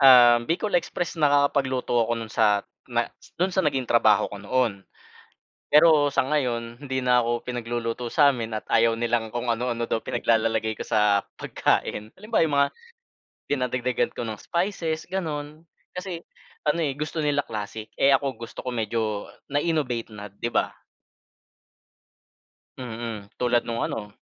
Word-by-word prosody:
Um, 125 Hz, -3 st, +8 dB
Bicol 180 Hz, +3 st, +1 dB
express, 175 Hz, 0 st, -4 dB
nakakapagluto 140 Hz, -5 st, +2 dB
ako 120 Hz, -, -1 dB
nun 115 Hz, -1 st, -6 dB
sa 105 Hz, -1 st, +3 dB, 0.3 s
na 120 Hz, 0 st, +1 dB, 0.3 s
dun 185 Hz, +1 st, +2 dB
sa 190 Hz, -, +3 dB
naging 135 Hz, -4 st, 0 dB
trabaho 110 Hz, -3 st, +4 dB
ko 100 Hz, -, -7 dB
noon. 105 Hz, -2 st, 0 dB, 0.9 s
Pero 150 Hz, -1 st, +6 dB
sa -, -, +3 dB
ngayon 120 Hz, -5 st, -1 dB
hindi 130 Hz, -2 st, -2 dB
na 125 Hz, -1 st, +5 dB
ako 120 Hz, 0 st, -1 dB
pinagluluto 120 Hz, -1 st, -3 dB
samin 130 Hz, -8 st, +3 dB
at -, -, -5 dB
ayaw 115 Hz, 0 st, +4 dB
nilang 115 Hz, -1 st, 0 dB
kung 120 Hz, 0 st, -2 dB
ano-ano 120 Hz, 0 st, -1 dB
daw -, -, +1 dB
pinaglalalagay 110 Hz, -1 st, +1 dB
ko -, -, -4 dB
sa 105 Hz, -2 st, +3 dB
pagkain. 105 Hz, +1 st, -1 dB
Halimbawa'yong 195 Hz, -8 st, +1 dB
mga 140 Hz, 0 st, +4 dB, 0.8 s
dinadagdagan 125 Hz, -2 st, 0 dB
ko -, -, -3 dB
ng 110 Hz, -2 st, -5 dB
spices 170 Hz, -3 st, -2 dB
gano'n. 155 Hz, -3 st, -4 dB, 0.3 s
Kasi 180 Hz, -2 st, -5 dB, 0.4 s
ano, 150 Hz, +3 st, +2 dB
eh, 140 Hz, -4 st, 0 dB
gusto 155 Hz, +2 st, -3 dB
nila 145 Hz, -1 st, +1 dB
classic, 110 Hz, 0 st, -6 dB
eh, 140 Hz, -, +5 dB
ako 135 Hz, +1 st, +1 dB, 0.2 s
gusto 115 Hz, -, -9 dB
ko 130 Hz, -, -3 dB
medyo 110 Hz, -2 st, -1 dB, 0.2 s
na-innovate 145 Hz, -6 st, 0 dB
na, 105 Hz, 0 st, -8 dB
'di 100 Hz, +4 st, -4 dB
ba? -, -, +1 dB, 2.1 s
Mm. 115 Hz, -4 st, -6 dB
Tulad 120 Hz, -1 st, +1 dB
nung 115 Hz, 0 st, -2 dB
ano, 105 Hz, -2 st, -4 dB
120 Hz, 145 wpm, -25 LUFS, 115-145 Hz, 2.1 s, Um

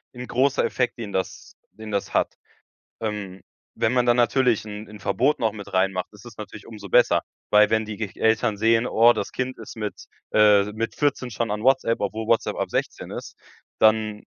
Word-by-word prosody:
'n-'n 125 Hz, +1 st, -6 dB
großer 135 Hz, +3 st, +2 dB
Effekt, 125 Hz, -1 st, -1 dB
den 110 Hz, -4 st, -6 dB
das 95 Hz, -, -4 dB, 0.2 s
den 110 Hz, -1 st, -10 dB
das 100 Hz, -1 st, -2 dB
hat. -, -, +1 dB, 0.7 s
Ähm, 105 Hz, -4 st, -4 dB, 0.3 s
wenn 110 Hz, -, +1 dB
man 125 Hz, -1 st, +2 dB
dann 120 Hz, 0 st, +4 dB
natürlich 120 Hz, -1 st, +2 dB
'n 105 Hz, 0 st, -8 dB
'n 105 Hz, -1 st, -12 dB
Verbot 125 Hz, +11 st, +1 dB
noch 110 Hz, -2 st, 0 dB
mit 105 Hz, -2 st, -10 dB
reinmacht, 95 Hz, 0 st, 0 dB
ist 105 Hz, +1 st, -16 dB
das 120 Hz, -3 st, -12 dB
natürlich 105 Hz, -1 st, -9 dB
umso 105 Hz, -3 st, -10 dB
besser. 125 Hz, +3 st, +4 dB, 0.3 s
Weil 105 Hz, 0 st, +5 dB
wenn 110 Hz, 0 st, +2 dB
die 105 Hz, -1 st, -6 dB
g 105 Hz, -1 st, -4 dB
Eltern 110 Hz, -1 st, +2 dB
sehen: 115 Hz, +3 st, +3 dB
„Oh, 120 Hz, 0 st, +5 dB
das -, -, -4 dB
Kind 130 Hz, 0 st, -3 dB
ist 110 Hz, -, -10 dB
mit 105 Hz, -2 st, -5 dB, 0.3 s
äh, 105 Hz, -1 st, +5 dB
mit 115 Hz, +1 st, -4 dB
14 140 Hz, -4 st, 0 dB
schon 115 Hz, +1 st, -2 dB
an 105 Hz, 0 st, -3 dB
WhatsApp", 130 Hz, -2 st, +2 dB
obwohl 110 Hz, +2 st, -3 dB
WhatsApp 115 Hz, 0 st, +1 dB
ab -, -, -3 dB
16 -, -, -3 dB
ist, -, -, -8 dB, 0.4 s
dann 110 Hz, -1 st, +2 dB
110 Hz, 195 wpm, -24 LUFS, 105-120 Hz, 0.7 s, Weil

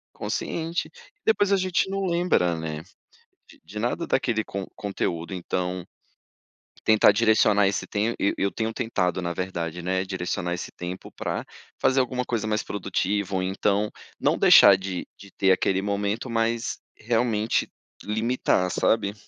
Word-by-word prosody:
consciente 165 Hz, +1 st, -3 dB
e -, -, -22 dB, 0.3 s
depois 205 Hz, -2 st, +3 dB
a 200 Hz, -, +5 dB
gente 185 Hz, 0 st, 0 dB
não 195 Hz, 0 st, -2 dB
lembra, 170 Hz, -, +2 dB
né, 80 Hz, -1 st, -5 dB, 0.7 s
de -, -, -17 dB
de 105 Hz, -, -7 dB
nada 120 Hz, +9 st, -1 dB
daquele 115 Hz, -4 st, 0 dB
con 100 Hz, -2 st, -5 dB
conteúdo, 90 Hz, -3 st, -3 dB
então 90 Hz, 0 st, -3 dB, 1.0 s
tentar 110 Hz, -1 st, +6 dB
direcionar 105 Hz, -2 st, +4 dB
esse 100 Hz, -, -2 dB
tem 110 Hz, +3 st, 0 dB
e 100 Hz, -, +2 dB
eu -, -, -1 dB
eu -, -, -4 dB
tenho 110 Hz, +4 st, -2 dB
tentado, 95 Hz, -7 st, -1 dB
na 85 Hz, -1 st, -2 dB
verdade, 85 Hz, -1 st, -4 dB
né, 95 Hz, +1 st, 0 dB
direcionar 90 Hz, -1 st, -3 dB
esse 90 Hz, -, -5 dB
tempo 90 Hz, +1 st, -7 dB
pra -, -, -4 dB, 0.3 s
fazer 130 Hz, +1 st, +3 dB
alguma 125 Hz, 0 st, -2 dB
coisa 115 Hz, -3 st, -2 dB
mais 110 Hz, 0 st, 0 dB
produtiva 100 Hz, 0 st, -2 dB
ou 95 Hz, -, +1 dB
então, 100 Hz, +2 st, 0 dB, 0.3 s
não -, -, +2 dB
deixar 100 Hz, -, +8 dB
de 95 Hz, -2 st, -5 dB
de 100 Hz, -1 st, -14 dB
ter 95 Hz, -1 st, +2 dB
aquele 95 Hz, +1 st, +2 dB
momento, 100 Hz, +4 st, -2 dB
mas, 115 Hz, 0 st, 0 dB, 0.2 s
realmente, 115 Hz, -1 st, 0 dB, 0.4 s
limitar, 110 Hz, -3 st, +1 dB
sabe. 100 Hz, 0 st, +1 dB
105 Hz, 155 wpm, -25 LUFS, 95-115 Hz, 1.0 s, deixar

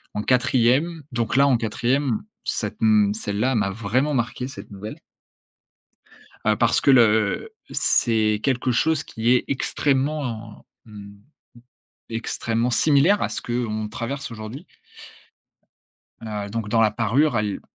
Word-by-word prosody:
en 105 Hz, -, -2 dB
quatrième 130 Hz, +6 st, +2 dB
donc 120 Hz, -2 st, -2 dB
là 140 Hz, +1 st, +5 dB
en 130 Hz, -4 st, +3 dB
quatrième 120 Hz, +3 st, -1 dB, 0.2 s
cette 105 Hz, -2 st, -3 dB
m 105 Hz, -2 st, +4 dB
celle-là 110 Hz, +4 st, -1 dB
m'a 105 Hz, -4 st, +1 dB
vraiment 115 Hz, +8 st, -1 dB
marqué 120 Hz, +1 st, -2 dB
cette 105 Hz, -6 st, -11 dB
nouvelle. 105 Hz, +2 st, -8 dB, 1.5 s
Heu, -, -, +2 dB
parce -, -, +2 dB
que -, -, +3 dB
le 110 Hz, -, +3 dB, 0.2 s
c'est 110 Hz, -2 st, +2 dB
quelque 130 Hz, -2 st, 0 dB
chose 155 Hz, +5 st, +1 dB
qui 115 Hz, +1 st, -2 dB
est 125 Hz, -, +1 dB
extrêmement, 135 Hz, -5 st, -2 dB, 0.2 s
hem, 100 Hz, -2 st, -12 dB, 0.9 s
extrêmement 115 Hz, +1 st, -2 dB
similaire 155 Hz, -, +4 dB
à -, -, +1 dB
ce -, -, -5 dB
qu'on 110 Hz, -3 st, -3 dB
traverse 135 Hz, +6 st, -5 dB
aujourd'hui. 115 Hz, -, -8 dB, 1.5 s
Heu, 105 Hz, -3 st, -5 dB
donc 110 Hz, 0 st, -4 dB
dans 115 Hz, +1 st, +2 dB
La 110 Hz, -2 st, +4 dB
Parure, 120 Hz, +6 st, +1 dB
elle 105 Hz, -2 st, -2 dB
115 Hz, 130 wpm, -23 LUFS, 110-130 Hz, 1.5 s, là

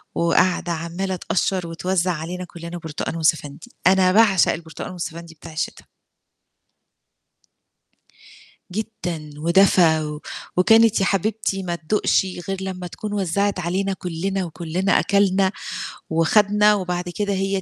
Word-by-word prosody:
وقاعدة 175 Hz, +1 st, +2 dB
عمّالة 170 Hz, +3 st, -3 dB
تقشّر، 180 Hz, 0 st, -1 dB
وتوزّع 180 Hz, +2 st, 0 dB
علينا 175 Hz, +3 st, -5 dB
كلّنا 170 Hz, 0 st, -8 dB
برتقان، 160 Hz, -1 st, -5 dB
وسَفَندي. 160 Hz, +5 st, -1 dB, 0.2 s
أنا 185 Hz, 0 st, +5 dB
باعشق 200 Hz, -3 st, +5 dB
البرتقان، 160 Hz, +1 st, -7 dB
والسَفَندي 170 Hz, -1 st, -7 dB
بتاع 155 Hz, +1 st, -12 dB
الشتا. 155 Hz, -, -4 dB, 2.8 s
جدًا، 180 Hz, -6 st, -5 dB
ودفى، 170 Hz, 0 st, +4 dB
و 150 Hz, 0 st, -5 dB, 0.4 s
وكانت 225 Hz, +3 st, +5 dB
يا -, -, +3 dB
حبيبتي 200 Hz, 0 st, -1 dB
ما 175 Hz, -1 st, -2 dB
تدوقش 180 Hz, +4 st, +1 dB, 0.2 s
غير 195 Hz, -, -1 dB
لمّا 185 Hz, -2 st, -5 dB
تكون 210 Hz, +4 st, -6 dB
وزّعت 200 Hz, 0 st, 0 dB
علينا 190 Hz, +3 st, -1 dB
كلّنا، 185 Hz, +2 st, -3 dB
وكلّنا 175 Hz, +4 st, 0 dB
أكلنا 195 Hz, -1 st, +2 dB, 0.6 s
وخدنا، 210 Hz, +6 st, +4 dB
وبعد 180 Hz, -2 st, -2 dB
كده 205 Hz, -1 st, -1 dB
هي 195 Hz, 0 st, -1 dB
180 Hz, 115 wpm, -22 LUFS, 170-195 Hz, 2.8 s, أنا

